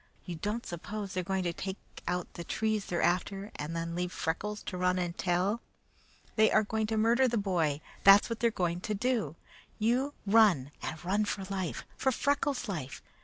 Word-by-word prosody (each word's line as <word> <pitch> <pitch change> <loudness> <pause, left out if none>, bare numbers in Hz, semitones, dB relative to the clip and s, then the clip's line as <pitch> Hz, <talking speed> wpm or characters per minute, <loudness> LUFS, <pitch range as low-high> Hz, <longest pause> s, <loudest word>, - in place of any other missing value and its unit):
You 180 - -4
don't 210 +8 -3
suppose 195 +3 -5
they 185 - 0
are - - -6
going 190 +1 -1
to 175 -1 -1
take 190 +3 -4 0.3
out 180 0 -2
the 170 - -6
trees 215 +3 -1
they're 175 - 0
after 195 +3 0
and 150 +3 -4
then 165 0 -2
leave 180 +1 -2
Freckles 210 +7 -2
to 185 - -5
run 180 0 +2
and 175 -1 -2
tell? 190 +6 +1 0.8
They 220 0 +6
are - - +5
going 220 +1 -1
to 220 0 -1
murder 235 +4 +4
the 235 -1 0
boy; 170 -8 +1 0.2
that's 195 +1 +8
what 230 -1 -4
they 235 - +4
are - - +3
going 175 -5 -1
to 215 - -2
do. 220 - 0 0.4
You 250 +6 +1
run, 195 - +5
and 160 +2 -5
run 205 +4 +2
for 200 -1 -2
life! 190 -3 -3
For 265 - +2
Freckles' 280 0 0
life! 155 -10 -5
195 Hz, 200 wpm, -31 LUFS, 175-220 Hz, 0.8 s, that's